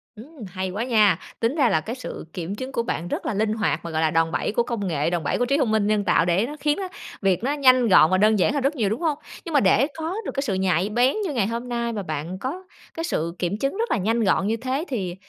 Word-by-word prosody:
Ừm, 260 +4 -12
hay 185 +1 -4
quá 205 +5 -3
nha. 215 -8 +3 0.2
Tính 230 +5 0
ra 275 -7 +3
là 160 -6 +2
cái 225 +9 -5
sự 255 - -7
kiểm 180 +2 -4
chứng 260 +5 -6
của 235 -3 -1
bạn 175 -7 -3
rất - - -4
là - - -1
linh 215 +1 0
hoạt 215 -3 0
mà, 170 - -5
gọi 160 0 0
là, 160 -1 +2
đòn 165 0 +2
bẩy - - -1
của 235 +3 +1
công 230 -5 -3
nghệ, 155 -3 0
đòn 175 -2 -2
bẩy - - 0
của 245 - +1
trí 275 +3 +1
thông 260 -7 +1
minh 215 -2 +2
nhân 210 -1 +1
tạo 165 - +3
để 180 +5 +2
nó 295 +4 -6
khiến 295 +1 +1
á, 390 -1 -3 0.3
việc 190 0 +1
nó 275 +3 +1
nhanh 255 -4 +4
gọn 170 -5 +6
và 185 - +4
đơn 215 +1 +4
giản 185 - +2
hơn 285 - 0
rất 280 +3 +1
nhiều, 220 -7 0
đúng 220 - -3
hông? 310 -4 0 0.3
Nhưng 335 - -6
mà 290 - +5
để 220 +6 +4
có 325 +3 -3
được - - -3
cái 275 - -1
sự 230 -8 -1
nhạy 190 0 +1
bén 245 +5 +2
như 320 - -2
ngày 225 -7 +1
hôm 235 +2 -4
nay 235 -1 -2
và 205 -2 -3
bạn 160 +3 -5
có 310 - -4 0.3
cái 330 - -4
sự 170 - -2
kiểm 180 +3 -1
chứng 275 - -2
rất 460 +2 -1
là - - +2
nhanh 225 +4 +1
gọn 195 -1 +2
như 225 +2 0
thế 260 +6 -2
thì, 190 -9 -3
220 Hz, 300 wpm, -23 LUFS, 185-260 Hz, 0.3 s, gọn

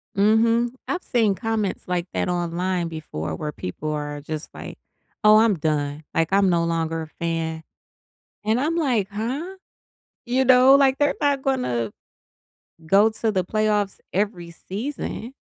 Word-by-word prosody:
Mhm. 230 +3 +3 0.2
I've 365 - -2
seen 225 -5 +2
comments 220 -4 -2
like 180 0 -1
that - - -1
online 175 0 -1
before, 85 - -5
where 150 - -4
people 150 +8 -5
are 145 -1 -4
just 155 +1 -6
like, - - -9 0.5
"Oh, 215 0 +8
I'm 220 -2 +4
done. 150 -1 -2
Like, 165 +2 +1
I'm 195 -1 +4
no 170 -1 +2
longer 165 -1 -1
a - - -9
fan." 160 0 -3 0.8
And 220 +3 +2
I'm 315 +4 0
like, 250 - +1
"Huh?" 260 - -4 0.7
You 255 +2 +2
know? 255 +1 +7
Like, 275 -1 +4
they're 290 0 +2
not 280 -2 +1
gonna 125 - 0 1.0
go 200 +6 +5
to 220 0 -1
the 185 -2 0
playoffs 210 0 0
every 185 -3 -2
season. 235 - -5
200 Hz, 145 wpm, -23 LUFS, 165-235 Hz, 1.0 s, Oh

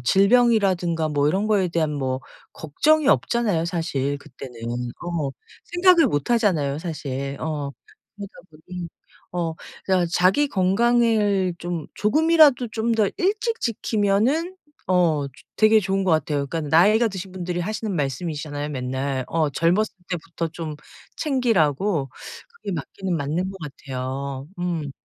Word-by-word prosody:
질병이라든가 195 - +3
뭐 145 -1 +1
이런 195 +7 0
거에 200 -4 +2
대한 165 -3 0
뭐 130 -2 -2 0.3
걱정이 295 - +2
없잖아요, 215 -13 +2
사실 145 -5 -1
그때는. 130 -2 -11 0.5
어. 165 -5 -2 0.3
생각을 350 -1 +4
못 145 - -1
하잖아요, 170 -12 +2
사실. 140 -4 -4
어. 150 -3 -3 0.5
그러다 200 -1 -8 0.2
보니 170 +3 -8 0.4
어 170 -2 -2 0.3
그래가 185 -2 +2
자기 190 +12 +3
건강을 205 -2 +2
좀 170 -3 -4
조금이라도 300 +1 +4
좀 225 +1 -1
더 215 -3 +3
일찍 425 +4 0
지키면은 230 - 0 0.3
어 170 -6 +2
조 - - -18 0.3
되게 215 0 +6
좋은 195 0 0
것 190 - +1
같아요. 150 -3 0
그러니까 160 0 -4
나이가 215 +7 +5
드신 190 -2 -7
분들이 180 -1 -3
하시는 215 +2 -3
말씀이시잖아요 145 0 -3
맨날. 130 0 -2
어, 160 -3 +1
젊었을 175 +9 +1 0.2
때부터 170 -1 -4
좀 160 -2 -6 0.4
챙기라고 195 - +1 0.4
그게 465 - -7
맞기는 180 +4 -4
맞는 160 +6 -2
것 195 - -10
같아요. 135 -1 -5
음. 170 -5 -2
175 Hz, 295 characters per minute, -23 LUFS, 150-215 Hz, 0.5 s, 되게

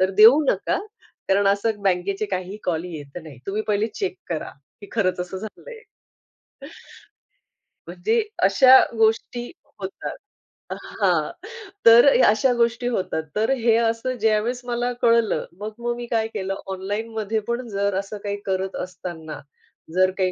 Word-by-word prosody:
तर 185 +1 +3
देऊ 250 +8 +9
नका. 195 - 0 0.5
कारण 200 +1 +3
असं 205 +1 0
बँकेचे 195 +2 0
काहीही 185 +1 -4
कॉल 170 -1 -1
येत 150 -2 -8
नाहीत. 145 -6 -12
तुम्ही 210 +2 -2
पहिले 210 +1 +2
चेक 190 -2 -3
करा 160 -3 -3 0.3
की 205 - -11
खरंच 185 -6 0
असं 180 +1 -5
झालंय." 440 - -10 2.1
म्हणजे 180 - 0 0.2
अशा 255 +7 +7 0.2
गोष्टी 225 +2 +1 0.3
होतात 190 0 -6 0.5
अ, - - -3
हां. - - 0 0.5
तर 230 +2 +9 0.2
अशा 220 +5 +3
गोष्टी 235 +1 +1
होतात. 185 -8 -1
तर 220 +3 +1
हे 230 -1 +3
असं 230 +2 0
ज्यावेळेस 220 +3 +1
मला 245 0 -1
कळलं, 230 -2 +3
मग 215 +1 -5
मग 240 0 -2
मी 240 0 -6
काय 225 -1 +1
केलं 195 0 -3 0.2
ऑनलाईनमध्ये 215 +3 -3
पण 235 +1 -2
जर 200 -1 -1
असं 200 +2 -6
काही 205 0 -3
करत 190 0 -2
असताना, 165 -3 -7 0.6
जर 185 0 +4
काही 185 -1 +1
210 Hz, 140 wpm, -23 LUFS, 190-230 Hz, 2.1 s, देऊ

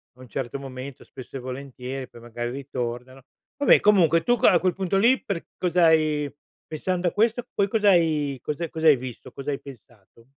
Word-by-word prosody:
a - - -26
un 130 - -12
certo 135 +1 -4
momento, 135 0 -8
spesso 130 +1 -10
e - - -6
volentieri, 130 0 -6
e - - -10
poi 120 - -15
magari 120 +1 -5
ritornano. 130 -1 -5 0.3
Vabbè 285 - +6
comunque 170 -5 +4
tu 245 +5 +2
que - - +4
a 175 - +6
quel 180 0 +1
punto 190 +1 -1
lì 235 +6 +4
per 190 -5 -4
cosa 180 -1 +2
hai 155 -3 +2 0.4
pensando 180 +3 -2
a - - +1
questo 230 +3 +1
poi 200 -1 +1
cos'hai 165 - +2
cos'ha 150 +4 -4
cos'hai 160 -2 +4
visto? 125 0 -9
Cosa 140 +1 -5
hai 140 - -3
pensato? 120 -4 -16
145 Hz, 190 wpm, -24 LUFS, 130-180 Hz, 0.4 s, Vabbè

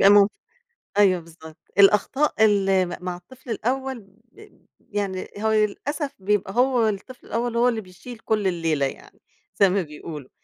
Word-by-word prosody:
بيبقى 195 - +7
ممكن. 205 0 +6 0.7
أيوه 190 -4 +4
َبالضبط، 160 -1 -14 0.2
الأخطاء 220 +5 +4
اللي 195 -3 +3
م - - -7
مع 180 -1 -3
الطفل 255 +9 -16
الأول 260 +3 -2 0.3
بب 425 +7 -18
يعني 200 -2 -4
هو 220 +1 0
ي 215 -1 +4
للأسف 290 +7 -4
بيبقى 195 0 0
هو 250 -2 +3
الطفل 215 +5 -5
الأول، 235 +1 -2
هو 240 +1 +4
اللي 225 -2 -2
بيشيل 185 +6 -11
كل 215 -3 0
الليلة 165 -5 0
يعني 135 - -8 0.4
زي 200 - +6
ما 190 +1 +1
بيقولوا، 150 -3 -8
205 Hz, 160 wpm, -24 LUFS, 185-235 Hz, 0.7 s, بيبقى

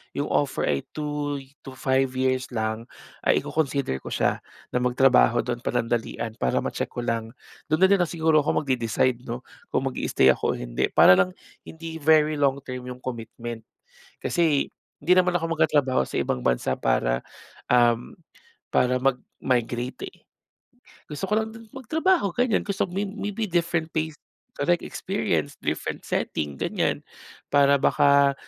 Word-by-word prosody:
yung 145 - -2
offer 145 -2 0
ay 70 -2 0
2 145 -2 -3
y 135 - -18
to 135 - -8
5 130 0 +1
years 130 0 0
lang 110 0 -2 0.4
ay - - +4
iko-consider 140 - -1
ko - - -7
siya - - +1 0.3
na - - 0
magtrabaho 125 - +4
do'n 120 0 -4
panandalian 115 -1 -2
para 65 - +1
ma-check - - -3
ko 120 - -4
lang. 115 -1 -2 0.4
Do'n 155 +3 +2
na 190 - +8
din 200 - +5
lang 175 - +2
siguro 160 -2 +3
ako - - +1
magde-decide, 125 -2 0
'no, 120 +1 -5 0.3
kung 135 - +1
mag-i-stay 65 - +2
ako - - 0
o - - -5
hindi - - -1
para 95 - +7
lang 90 -1 +2 0.3
hindi 160 0 -8
very 155 0 +4
long 140 -1 +2
term 125 -2 -7
yung 125 0 -7
commitment. 115 -1 -6 0.5
Kasi 160 -5 +1 0.3
hindi 165 +5 +3
naman 180 -1 +3
ako 165 -1 -2
magtatrabaho 145 - +3
sa - - -8
ibang 65 - -1
bansa 60 0 +1
para, - - +1 0.5
um, 120 -1 +3 0.6
para 125 0 +3
mag-migrate, 125 - -1
eh. 370 - -19 0.9
Gusto 150 +6 -4
ko 215 - +4
lang 220 0 -3
do'n 225 -1 -13
magtrabaho, 265 - +1
ganyan. 245 -3 +1
Gusto 195 -2 -1
may 195 +3 -2
maybe 205 +2 -3
different 170 -1 0
place, 160 -1 -2 0.4
correct - - +2
experience, - - -2
different - - -3
setting, 75 -2 -2
ganyan. - - -1 0.5
Para 140 0 +5
baka 140 -1 +4
135 Hz, 155 wpm, -25 LUFS, 120-160 Hz, 0.9 s, na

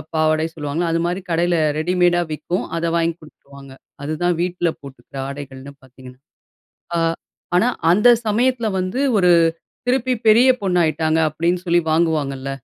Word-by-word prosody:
பாவாடை 155 0 +1
சொல்லுவாங்க, 150 +2 -3
அதுமாரி 170 +3 -1
கடையில 170 +1 +1 0.2
ரெடிமேடா 175 +1 +2
விற்கும், 175 +4 -3
அதை 165 0 -1
வாங்கி 165 0 0
குடுத்துருவாங்க. 140 -2 -15 0.3
அதுதான் 165 +3 -1
வீட்ல 175 -1 -1
போட்டுக்கிற 140 0 -12
ஆடைகள்னு 140 0 -9
பார்த்தீங்கன்னா. 130 0 -15 0.8
ஆ - - +1 0.6
ஆனா, 225 +7 +3 0.2
அந்த 210 +7 +4 0.2
சமயத்துல 235 +2 +1
வந்து 185 +9 -3 0.2
ஒரு, 180 -1 +4 0.6
திருப்பி 255 0 +1
பெரிய 235 +4 +6
பொண்ணு 185 -2 0
ஆயிட்டாங்க 160 0 +1
அப்பிடின்னு 170 +4 -1
சொல்லி 175 0 +3
வாங்குவாங்கள்ல. 145 -5 0
170 Hz, 130 wpm, -20 LUFS, 145-180 Hz, 0.8 s, பெரிய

